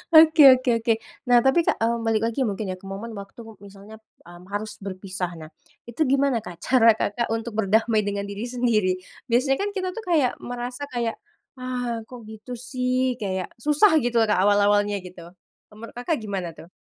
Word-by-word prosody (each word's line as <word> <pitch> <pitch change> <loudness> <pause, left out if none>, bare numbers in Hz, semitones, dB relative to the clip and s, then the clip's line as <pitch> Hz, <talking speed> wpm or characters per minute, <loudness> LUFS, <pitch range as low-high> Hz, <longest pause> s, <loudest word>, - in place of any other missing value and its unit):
Oke 315 0 +8 0.2
oke 255 -1 -2
oke, 230 0 0 0.4
nah 245 -1 +6
tapi, 265 +6 +4
Kak, - - +3
eee, 235 +1 +2
balik 220 -1 +1
lagi 230 +4 -4
mungkin 200 0 -3
ya - - -4
ke - - -14
momen 225 +4 -6
waktu 200 +4 -12 0.3
misalnya, 200 +2 -13 0.3
mmm, 175 0 -13
harus 210 +1 -3
berpisah 185 -2 -4
nah, 155 0 -10 0.4
itu 245 +7 -6
gimana, 275 -3 +2
Kak, 175 - -8
cara, 230 -3 +6
Kakak, 235 +3 -1
untuk 225 0 -5
berdamai 220 +2 +2
dengan 200 0 -2
diri 200 +3 -6
sendiri? 235 -6 +1 0.4
Biasanya 265 +3 +2
kan 410 - -1
kita 370 -1 -2
tuh 455 - -6
kayak 295 -7 +3
merasa 245 +2 -5
kayak, 235 -2 -1 0.4
"ah, 245 -2 -3
kok 250 0 -10
gitu 220 +3 -11 0.2
sih" 255 -1 0
kayak 190 -2 -2 0.2
susah 300 +7 +5
gitu 240 0 -2
loh, 225 - +3
Kak, 185 - +2
awal-awalnya 205 0 +3
gitu, 180 -1 -11 0.5
menurut, 215 +1 -11
Kakak, 245 +6 -1
gimana 195 -4 -4
tuh? 165 - -13
230 Hz, 180 wpm, -24 LUFS, 200-250 Hz, 0.5 s, Oke